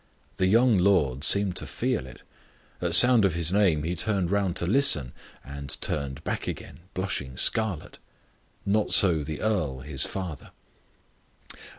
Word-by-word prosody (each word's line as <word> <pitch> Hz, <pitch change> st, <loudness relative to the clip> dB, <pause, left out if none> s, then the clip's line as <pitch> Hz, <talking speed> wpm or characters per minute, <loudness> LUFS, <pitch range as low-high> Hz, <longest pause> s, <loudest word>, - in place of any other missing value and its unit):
The 95 Hz, -, +1 dB
young 115 Hz, +1 st, +3 dB
lord 75 Hz, -8 st, +1 dB
seemed 100 Hz, 0 st, +3 dB
to -, -, -5 dB
feel 65 Hz, -, -3 dB
it; 65 Hz, 0 st, -15 dB, 0.6 s
at 90 Hz, -1 st, +1 dB
sound 120 Hz, +3 st, +8 dB
of 95 Hz, -4 st, 0 dB
his 85 Hz, +1 st, 0 dB
name 90 Hz, -7 st, +1 dB
he 85 Hz, +3 st, -3 dB
turned 95 Hz, -1 st, -2 dB
round 100 Hz, -3 st, -1 dB
to 85 Hz, -, -1 dB
listen, 90 Hz, -, +4 dB, 0.3 s
and 70 Hz, -1 st, -8 dB
turned 70 Hz, 0 st, -3 dB
back -, -, -5 dB
again, -, -, -8 dB, 0.2 s
blushing 70 Hz, -9 st, -4 dB
scarlet. 110 Hz, -8 st, -2 dB, 0.7 s
Not 105 Hz, +1 st, -1 dB
so 85 Hz, -6 st, +4 dB
the 75 Hz, 0 st, -7 dB
earl, 80 Hz, -12 st, -2 dB
his 70 Hz, 0 st, -3 dB
father. 90 Hz, -6 st, -7 dB
90 Hz, 150 wpm, -25 LUFS, 75-100 Hz, 0.7 s, sound